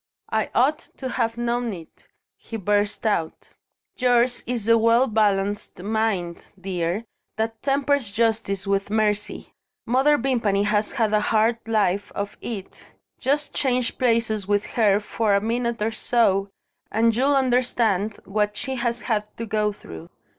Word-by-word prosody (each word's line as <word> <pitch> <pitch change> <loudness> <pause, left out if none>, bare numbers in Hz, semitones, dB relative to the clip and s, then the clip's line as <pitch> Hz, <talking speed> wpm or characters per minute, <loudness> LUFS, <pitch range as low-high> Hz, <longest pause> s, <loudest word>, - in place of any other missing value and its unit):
"I 220 -1 0
ought 290 +6 +3 0.2
to 260 - -4
have 230 -1 -1
known 240 -1 -1
it!" 165 -3 -12 0.3
he 225 - -8
burst 205 +2 0
out. 170 -7 -1 0.5
"Yours 245 -1 +3
is 240 -4 -2
the 230 +1 +5
well 230 +3 +4
balanced 205 -4 0
mind, 205 -5 -2
dear, 180 +2 -2 0.3
that 225 0 -3
tempers 280 -4 +1
justice 220 -3 0
with 195 0 0
mercy. 210 -1 -1 0.3
Mother 270 +5 +3
Vimpany 230 -6 +1
has 210 0 +1
had 225 -5 +1
a 210 - +3
hard 225 +2 +2
life 205 -3 +1
of 200 0 -4
it. 205 -5 -7 0.4
Just 290 +3 0
change 255 -3 0
places 230 -5 +1
with 205 0 +1
her 210 -4 +3
for 210 0 0
a - - +4
minute 235 +1 -1
or 225 - 0
so 200 -4 +1 0.4
and 225 +1 +2
you'll 275 +4 +3
understand 240 -6 +1
what 210 +1 -1
she 265 -2 -3
has 235 -1 -1
had 210 -3 -1
to 230 - -4
go 210 0 0
through. 80 - -11
220 Hz, 145 wpm, -23 LUFS, 205-240 Hz, 0.5 s, the